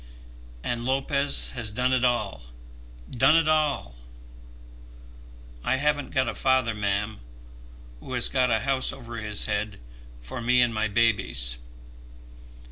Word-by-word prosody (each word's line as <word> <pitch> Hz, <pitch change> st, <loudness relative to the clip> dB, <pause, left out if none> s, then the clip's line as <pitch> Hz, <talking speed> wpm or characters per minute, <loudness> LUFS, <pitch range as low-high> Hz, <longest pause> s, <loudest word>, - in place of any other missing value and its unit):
And 120 Hz, -1 st, -3 dB
Lopez 135 Hz, +2 st, +2 dB
has 120 Hz, -4 st, -4 dB
done 125 Hz, +4 st, 0 dB
it 130 Hz, -1 st, +1 dB
all, 120 Hz, -, 0 dB, 0.7 s
done 130 Hz, +6 st, +4 dB
it 165 Hz, -1 st, +3 dB
all! 150 Hz, -, 0 dB, 1.7 s
I 130 Hz, -, +1 dB
haven't 145 Hz, +1 st, 0 dB
got 130 Hz, -2 st, 0 dB
a -, -, -2 dB
father, 130 Hz, -3 st, +1 dB
ma'am, 105 Hz, +1 st, -2 dB, 0.8 s
who 130 Hz, -, -9 dB
has 125 Hz, -2 st, +4 dB
got 130 Hz, -2 st, +1 dB
a 110 Hz, -2 st, +1 dB
house 135 Hz, -1 st, +1 dB
over 120 Hz, -4 st, -9 dB
his 105 Hz, -2 st, 0 dB
head 105 Hz, -, -3 dB, 0.4 s
for -, -, -7 dB
me 125 Hz, +1 st, +2 dB
and 120 Hz, -2 st, +3 dB
my 110 Hz, 0 st, 0 dB
babies. 100 Hz, -, 0 dB
120 Hz, 130 wpm, -25 LUFS, 110-130 Hz, 1.7 s, done